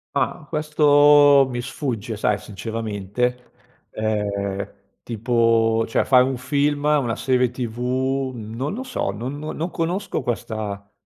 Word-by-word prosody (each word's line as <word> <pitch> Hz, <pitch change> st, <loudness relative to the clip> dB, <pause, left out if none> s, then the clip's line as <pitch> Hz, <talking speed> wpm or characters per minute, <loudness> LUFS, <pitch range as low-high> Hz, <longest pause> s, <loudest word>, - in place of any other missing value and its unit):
Ah, 155 Hz, -, -1 dB
questo 145 Hz, -2 st, +5 dB
mi 120 Hz, -1 st, -3 dB
sfugge, 120 Hz, -5 st, -4 dB
sai, 105 Hz, 0 st, +1 dB
sinceramente. 110 Hz, +3 st, -4 dB, 0.4 s
Ehm, 100 Hz, -2 st, -2 dB, 0.3 s
tipo 115 Hz, -1 st, +2 dB
cioè, -, -, +1 dB
fai 130 Hz, -2 st, +5 dB
un 130 Hz, +1 st, -1 dB
film, 145 Hz, +3 st, 0 dB
una 145 Hz, -6 st, +2 dB
serie 125 Hz, -2 st, +1 dB
tv, 130 Hz, +2 st, -2 dB
non 115 Hz, -, -5 dB
lo 250 Hz, +5 st, -4 dB
so, 255 Hz, -, -2 dB
non 125 Hz, +8 st, -5 dB
no 155 Hz, +1 st, -5 dB
non 165 Hz, +3 st, -3 dB
conosco 175 Hz, +4 st, -2 dB
questa, 110 Hz, -5 st, -4 dB
125 Hz, 125 wpm, -22 LUFS, 110-145 Hz, 0.4 s, questo